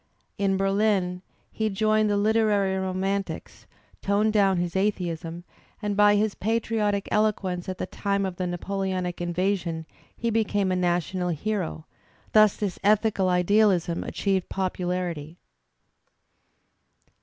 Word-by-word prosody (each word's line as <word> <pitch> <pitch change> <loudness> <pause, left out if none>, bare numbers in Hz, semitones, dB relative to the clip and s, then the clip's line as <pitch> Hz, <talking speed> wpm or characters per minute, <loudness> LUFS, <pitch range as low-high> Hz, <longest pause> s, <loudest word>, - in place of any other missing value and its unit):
In 195 -1 +2
Berlin 195 -2 +1 0.3
he 220 0 -1
joined 215 +1 +2
the 205 - +2
Uterary 210 -2 +2
romantics, 190 +1 -3 0.3
toned 210 +2 +1
down 195 -3 +3
his 175 0 -2
atheism, 175 -4 -2 0.4
and 210 -1 -2
by 205 0 +5
his 210 0 +1
patriotic 215 -2 -1
eloquence 195 -4 0
at 185 - -4
the - - -3
time 200 +1 -1
of 185 -2 -4
the 185 - -2
Napoleonic 185 0 -3
invasion 175 -2 -1 0.3
he 230 0 -1
became 205 -3 +1
a - - +1
national 180 0 0
hero; 175 -1 -3 0.5
thus 215 -2 +5
this 200 -4 -3
ethical 210 -2 +3
idealism 180 -1 +2
achieved 195 -2 -1
popularity. 180 -4 -3
195 Hz, 120 wpm, -26 LUFS, 180-210 Hz, 0.5 s, by